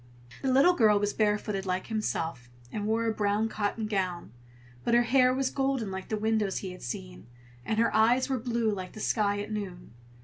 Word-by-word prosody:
The 265 - +1
little 275 +8 +6
girl 215 -9 +4
was 205 0 0
barefooted 210 -2 0
like 185 0 -1
himself, 165 - -3 0.2
and 205 +5 -3
wore 225 +1 +1
a 225 - +1
brown 210 +1 +1
cotton 215 +1 -2
gown, 185 - -2 0.5
but 235 - +2
her 240 - +5
hair 255 +1 +4
was 260 0 0
golden 270 -6 -1
like 190 0 -6
the 215 - -1
windows 215 -2 0
he 190 - -5
had 180 - -11
seen, 60 - -7 0.4
and 215 - -2
her 230 - +2
eyes 235 +4 +4
were 265 -2 -1
blue 230 -2 0
like 185 -3 -5
the - - -9
sky 205 -2 +1
at 210 +1 -7
noon. 185 - -6
215 Hz, 200 wpm, -29 LUFS, 195-230 Hz, 0.5 s, little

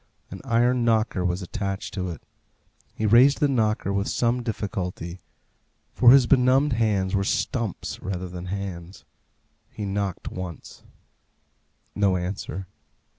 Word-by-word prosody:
An 95 - -8
iron 120 0 +2
knocker 110 -5 +1
was 90 +1 -1
attached 100 +1 -4
to 95 -2 -3
it. 85 - -8 0.7
He 110 - -2
raised 125 +6 +6
the 150 - +3
knocker 110 -6 0
with 100 0 0
some 120 +1 +1
difficulty, 95 -6 -4 0.7
for 120 - +6
his 130 0 +8
benumbed 130 +2 +4
hands 105 -5 +1
were 100 -1 +2
stumps 115 0 -2
rather 95 -1 -4
than 90 0 -7
hands. 95 -2 -6 0.6
He 105 - -6
knocked 100 -2 -3
once. 90 -3 -8 1.1
No 100 -3 +2
answer. 95 +1 -4
100 Hz, 125 wpm, -25 LUFS, 95-120 Hz, 1.1 s, his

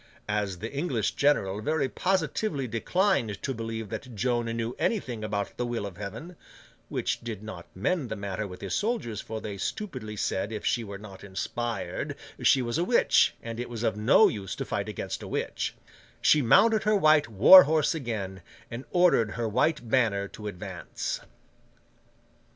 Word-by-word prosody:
As 105 -3 -1
the 110 +8 -6
English 135 - 0
general 105 -9 +1
very 150 +2 0
positively 170 -3 -1
declined 120 - 0
to 135 - -1
believe 115 -2 -5
that 125 +2 -7
Joan 120 +2 0
knew 115 +1 -3
anything 125 - -1
about 100 -1 -3
the 125 - -1
will 120 -3 -2
of 95 -3 -8
Heaven 115 - -7 0.5
(which - - -1
did 110 -3 -6
not 110 -6 -8
mend 135 - -1
the 110 - -3
matter 100 0 -4
with 90 -1 -10
his - - -4
soldiers, 210 - -1
for 110 0 -6
they 105 -2 -6
stupidly 130 - -4
said 100 0 -1
if 110 - -5
she 120 - +1
were 100 -2 -7
not 100 -2 -12
inspired 115 +5 -4 0.3
she 130 -2 +4
was 120 +6 -1
a - - +2
witch, 235 +6 +4
and 115 0 -6
it 120 - -4
was 120 -1 -5
of 110 - +1
no 120 - +5
use 100 -3 -4
to - - -4
fight - - -3
against - - -5
a - - -7
witch), - - -3 0.4
she 150 - +5
mounted 220 - +5
her 215 0 +2
white 155 -6 +5
war 120 - +9
horse 155 +1 +2
again, 105 - -4 0.3
and 120 +3 -6
ordered 175 - +4
her 120 -2 -2
white 125 +4 +1
banner 110 -5 +2
to 105 - -8
advance. 95 -3 -5
115 Hz, 175 wpm, -28 LUFS, 105-145 Hz, 0.5 s, war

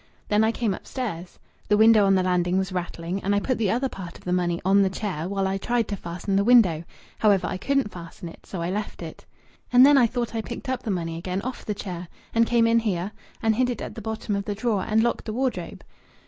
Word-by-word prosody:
Then 210 +1 +3
I 220 - +3
came 230 -3 -1
upstairs. 185 -6 -6 0.3
The 210 - +3
window 220 -2 +6
on 195 - +4
the 185 - +2
landing 180 0 +1
was 190 0 -1
rattling, 175 +1 -4
and 200 +1 +1
I - - +3
put 255 +4 -1
the 215 -4 +1
other 250 +5 +1
part 180 -8 -8
of - - -19
the 180 - -1
money 175 -1 0
on 195 +1 +5
the 195 - +3
chair 185 -4 -4
while 195 -1 -1
I 190 0 -1
tried 240 +1 0
to 205 - -1
fasten 180 +2 -4
the 200 - +3
window. 200 -9 +5 0.4
However, 205 -3 +3
I - - -2
couldn't 275 +1 0
fasten 170 +1 -9
it. 165 - -13
So 175 -4 -4
I 175 - -2
left 205 +2 -4
it. - - -10 0.4
And 250 +1 +8
then 285 0 +7
I 240 - +5
thought 240 -1 -3
I 225 - -1
picked 240 +4 -7
up 260 -1 -1
the 230 - -5
money 165 -4 -2
again 185 +3 -3
off 255 0 -5
the 210 - -2
chair 180 -3 -6 0.3
and 230 0 +3
came 235 -1 +3
in 230 0 +4
here 200 -3 -2 0.3
and 220 0 +3
hid 255 0 +2
it 240 - -3
at - - -6
the 225 - -8
bottom 220 -1 -3
of 200 0 -3
the 205 - -3
drawer 215 -2 0
and 220 +1 +3
locked 235 - -1
the 215 - -4
wardrobe." 255 +2 -3
205 Hz, 255 wpm, -25 LUFS, 185-230 Hz, 0.4 s, And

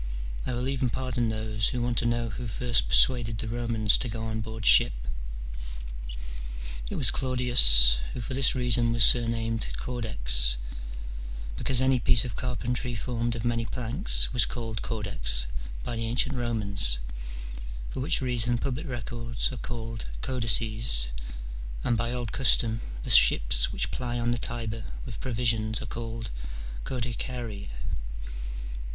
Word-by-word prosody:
I 130 - -2
will 125 +1 -2
even 135 -2 -1
pardon 120 -2 -2
those 110 -1 -1
who 125 - -4
want 120 -1 0
to 120 - -1
know 120 0 -1
who 120 +2 -6
first 120 +1 0
persuaded 115 -3 +3
the 115 - -4
Romans 115 -2 +1
to 125 - -3
go 110 0 -5
on 110 0 -4
board 110 0 -7
ship. - - +6 2.0
It - - -5
was - - +2
Claudius, 120 - +6 0.2
who 125 - -5
for 125 - -6
this 135 +1 +4
reason 120 -2 +2
was 115 -1 +6
surnamed 115 -1 +4
Caudex, - - +3 1.0
because 130 - +3
any 130 -1 +2
piece 115 +1 +4
of 120 - -6
carpentry 125 0 -2
formed 120 +1 -3
of 115 0 -5
many 115 -1 0
planks 125 - +1
was 125 - +3
called 115 -3 -5
caudex - - +2 0.4
by 120 - -4
the 115 0 -3
ancient 125 +3 +1
Romans, 105 - +1 0.9
for - - -6
which 145 +4 +1
reason 120 -1 +1
public 135 +6 -4
records 120 -1 -4
are 130 - -7
called 115 -2 -6
Codices, 115 - +5 0.7
and 120 - +1
by 115 +1 -2
old 120 -3 -4
custom 115 -3 +2 0.2
the - - -2
ships - - +5
which - - -3
ply 120 -1 -4
on 120 0 0
the 120 - -1
Tiber 115 -2 -3 0.2
with 120 -5 -8
provisions 110 -3 -1
are - - -7
called 115 -2 -6 0.5
codicariae. 120 - -5
115 Hz, 145 wpm, -27 LUFS, 110-125 Hz, 2.0 s, ship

